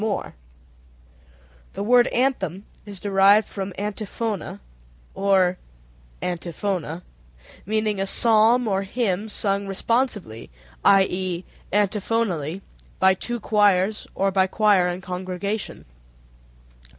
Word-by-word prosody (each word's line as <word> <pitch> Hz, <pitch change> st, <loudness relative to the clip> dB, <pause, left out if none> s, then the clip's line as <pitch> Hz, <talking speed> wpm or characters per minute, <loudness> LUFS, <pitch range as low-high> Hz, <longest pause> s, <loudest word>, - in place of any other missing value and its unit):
] -, -, -29 dB
The -, -, -3 dB
word 245 Hz, +3 st, +5 dB
anthem 205 Hz, -, -1 dB, 0.2 s
is 200 Hz, -2 st, -9 dB
derived 200 Hz, +2 st, +4 dB
from 195 Hz, -1 st, -5 dB
antifona 210 Hz, -, -4 dB, 0.5 s
(or 190 Hz, -2 st, +2 dB, 0.6 s
antiphona), 175 Hz, -1 st, -3 dB, 0.6 s
meaning 215 Hz, -2 st, 0 dB
a 195 Hz, -, -1 dB
psalm 230 Hz, +3 st, +4 dB
or 195 Hz, -2 st, +1 dB
hymn 205 Hz, 0 st, -2 dB
sung 200 Hz, -1 st, -1 dB
responsively, 205 Hz, -, -2 dB, 0.3 s
i.e., 185 Hz, -2 st, +3 dB, 0.3 s
antiphonally, 200 Hz, -5 st, 0 dB, 0.4 s
by 190 Hz, 0 st, +5 dB
two 240 Hz, +5 st, -4 dB
choirs, 205 Hz, -1 st, +2 dB
or 195 Hz, 0 st, +1 dB
by 190 Hz, 0 st, +3 dB
choir 205 Hz, -3 st, +3 dB
and 180 Hz, +1 st, -4 dB
congregation. 185 Hz, +3 st, -4 dB
195 Hz, 95 wpm, -23 LUFS, 180-215 Hz, 0.6 s, word